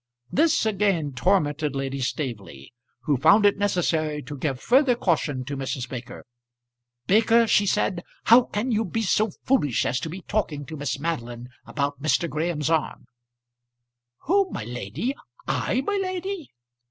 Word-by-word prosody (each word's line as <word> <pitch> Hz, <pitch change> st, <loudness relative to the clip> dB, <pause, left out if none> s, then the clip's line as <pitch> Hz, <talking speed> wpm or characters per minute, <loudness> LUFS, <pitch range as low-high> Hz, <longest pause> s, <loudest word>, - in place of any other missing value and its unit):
This 315 Hz, -5 st, +3 dB
again 195 Hz, -9 st, +1 dB
tormented 150 Hz, -1 st, +1 dB
Lady 135 Hz, 0 st, -3 dB
Staveley, 110 Hz, -, -5 dB, 0.3 s
who 145 Hz, -4 st, +1 dB
found 205 Hz, -, +5 dB
it 205 Hz, 0 st, +4 dB
necessary 160 Hz, -6 st, 0 dB
to 145 Hz, +3 st, -7 dB
give 135 Hz, -2 st, -2 dB
further 255 Hz, -, +4 dB
caution 150 Hz, -, 0 dB
to 140 Hz, +1 st, -4 dB
Mrs. 135 Hz, -2 st, -3 dB
Baker. 125 Hz, -2 st, -8 dB, 0.8 s
"Baker," 225 Hz, +3 st, +4 dB
she 205 Hz, -2 st, +3 dB
said, 185 Hz, -2 st, 0 dB, 0.2 s
"how 235 Hz, +2 st, +7 dB
can 240 Hz, +1 st, -3 dB
you 220 Hz, 0 st, +2 dB
be 225 Hz, +3 st, -2 dB
so 215 Hz, +2 st, +2 dB
foolish 145 Hz, -, +2 dB
as 125 Hz, -, 0 dB
to 160 Hz, -, -5 dB
be 185 Hz, +4 st, -7 dB
talking 160 Hz, -9 st, -2 dB
to 160 Hz, -, -8 dB
Miss 145 Hz, -1 st, -3 dB
Madeline 125 Hz, -6 st, -4 dB, 0.2 s
about 145 Hz, -1 st, -2 dB
Mr. 155 Hz, +3 st, +1 dB
Graham's 155 Hz, -1 st, -1 dB
arm?" 160 Hz, -2 st, -1 dB, 1.2 s
"Who, 390 Hz, +4 st, +2 dB
my -, -, -5 dB
lady? 125 Hz, -, -4 dB, 0.3 s
I, 255 Hz, -, 0 dB
my 405 Hz, +8 st, -1 dB
lady?" 370 Hz, -2 st, -4 dB
160 Hz, 150 wpm, -25 LUFS, 140-220 Hz, 1.2 s, how